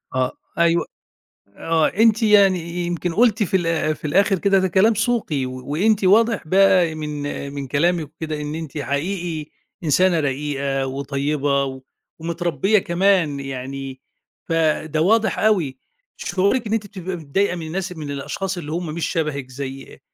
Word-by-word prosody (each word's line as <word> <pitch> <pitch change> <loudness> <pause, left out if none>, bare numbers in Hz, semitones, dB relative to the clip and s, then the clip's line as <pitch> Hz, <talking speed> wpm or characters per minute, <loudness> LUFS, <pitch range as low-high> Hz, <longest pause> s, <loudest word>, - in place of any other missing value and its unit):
آه، 130 0 +1 0.3
أيوه 170 0 +3 0.7
آه، 165 -1 +2
أنتِ 225 +1 +3
يعني 200 -4 +5 0.3
يمكن 175 0 -2
قُلتِ 220 +1 +3
في 190 - +1
ال 165 -3 0
في - - -11
الآخر 195 +4 +3
كده 195 -1 +3
ده 190 - +1
كلام 195 +6 +4
سوقي، 220 - 0
و 130 0 -7
وأنتِ 205 +6 +2
واضح 220 -1 +3
بقى 185 -2 +4
من 155 -1 -5 0.4
من 140 -2 -5
كلامِك 165 +3 +1
وكده 155 -2 -4
إن 150 +1 -4
أنتِ 160 -1 -6
حقيقي 155 +2 -3 0.3
إنسانة 170 +3 +3
رقيقة 140 -1 -1
وطيبة 140 +1 -1
و 130 -1 -6 0.4
ومتربية 170 +4 +1
كمان 175 -5 +2
يعني، 135 0 -6 0.5
فده 155 -1 +1
واضح 220 +5 +2
أوي، 175 -12 +1 0.4
شعورِك 200 +5 0
إن 215 - -2
أنتِ 210 -2 -1
بتبقى 185 -2 -6
متضايقة 175 +5 -1
من 165 -2 -6
الناس 180 +3 -3
من 155 -5 -6
الأشخاص 185 +7 -4
اللي 155 -3 -6
هُم 175 +2 -2
مش 170 - -1
شبهِك 150 -6 -2
زي 135 +1 -8
165 Hz, 150 wpm, -21 LUFS, 145-195 Hz, 0.7 s, يعني